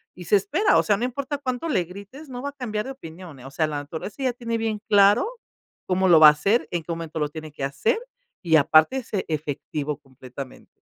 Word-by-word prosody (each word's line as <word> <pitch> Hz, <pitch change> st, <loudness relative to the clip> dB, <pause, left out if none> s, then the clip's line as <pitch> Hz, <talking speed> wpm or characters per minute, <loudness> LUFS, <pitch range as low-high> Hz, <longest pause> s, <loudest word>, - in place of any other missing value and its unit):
Y 180 Hz, -, -10 dB
se 205 Hz, -, +3 dB
espera, 325 Hz, -, +2 dB
o -, -, +4 dB
sea, 205 Hz, -, +2 dB
no 235 Hz, -, -1 dB
importa 280 Hz, +3 st, -3 dB
cuánto 260 Hz, +3 st, -3 dB
le 185 Hz, -, +1 dB
grites, 200 Hz, -, -11 dB
no 250 Hz, -2 st, -7 dB
va 285 Hz, -, -3 dB
a -, -, -9 dB
cambiar 225 Hz, -6 st, -4 dB
de 265 Hz, -, -5 dB
opinión, 165 Hz, -, -11 dB
eh, 125 Hz, -, -13 dB
o 135 Hz, -, -9 dB
sea, 155 Hz, +3 st, 0 dB
la 150 Hz, -, -3 dB
naturaleza 160 Hz, -, -6 dB
ya 255 Hz, -, +1 dB
tiene 230 Hz, -1 st, -3 dB
bien 225 Hz, -2 st, -2 dB
claro 205 Hz, -, +5 dB, 0.6 s
cómo 185 Hz, 0 st, +2 dB
lo 165 Hz, -, +8 dB
va 155 Hz, -, +10 dB
a -, -, +7 dB
hacer, 200 Hz, +11 st, +1 dB
en 170 Hz, -2 st, -2 dB
qué 170 Hz, -, -6 dB
momento 165 Hz, -1 st, -5 dB
lo 150 Hz, -1 st, 0 dB
tiene 155 Hz, 0 st, -8 dB
que 145 Hz, -, -7 dB
hacer 140 Hz, -, 0 dB, 0.4 s
y, 165 Hz, -3 st, +2 dB
aparte, 155 Hz, -, +4 dB
es 255 Hz, -, -6 dB, 0.2 s
efectivo 150 Hz, -1 st, -3 dB
completamente. 130 Hz, -1 st, -11 dB
185 Hz, 235 wpm, -24 LUFS, 155-245 Hz, 0.6 s, va